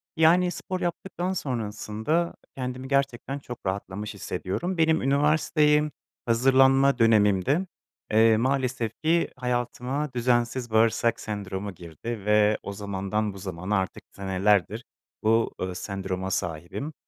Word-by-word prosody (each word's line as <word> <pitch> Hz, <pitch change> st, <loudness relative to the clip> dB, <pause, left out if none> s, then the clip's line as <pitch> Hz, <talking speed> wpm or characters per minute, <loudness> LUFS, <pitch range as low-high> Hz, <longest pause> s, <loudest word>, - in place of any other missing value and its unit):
Yani, 175 Hz, +2 st, +4 dB
spor 185 Hz, +1 st, -4 dB
yaptıktan 180 Hz, +1 st, -2 dB
sonrasında 120 Hz, -, -2 dB, 0.2 s
kendimi 130 Hz, 0 st, -4 dB
gerçekten 140 Hz, 0 st, -1 dB
çok 120 Hz, -5 st, -9 dB
rahatlamış 100 Hz, +2 st, -3 dB
hissediyorum. 175 Hz, -, -3 dB
Benim 160 Hz, 0 st, +3 dB
üniversiteye 150 Hz, +2 st, +3 dB, 0.3 s
hazırlanma 135 Hz, +3 st, +4 dB
dönemimdi, 115 Hz, -, +3 dB, 0.5 s
eee, 110 Hz, 0 st, +5 dB
maalesef 125 Hz, -2 st, 0 dB
ki 165 Hz, +2 st, +2 dB
hayatıma 125 Hz, +3 st, -2 dB
düzensiz 120 Hz, 0 st, 0 dB
bağırsak 115 Hz, +1 st, +3 dB
sendromu 100 Hz, -1 st, -5 dB
girdi 95 Hz, +6 st, -7 dB
ve 105 Hz, 0 st, +4 dB
o 100 Hz, -, -5 dB
zamandan 100 Hz, +1 st, -2 dB
bu -, -, -10 dB
zamana 95 Hz, +1 st, -2 dB
artık 95 Hz, -3 st, -3 dB
senelerdir 100 Hz, +3 st, +1 dB, 0.4 s
bu, 115 Hz, +1 st, +3 dB
ııı, 90 Hz, -1 st, -3 dB
sendroma 95 Hz, -1 st, -4 dB
sahibim. 85 Hz, -, -3 dB
115 Hz, 110 wpm, -26 LUFS, 100-140 Hz, 0.5 s, eee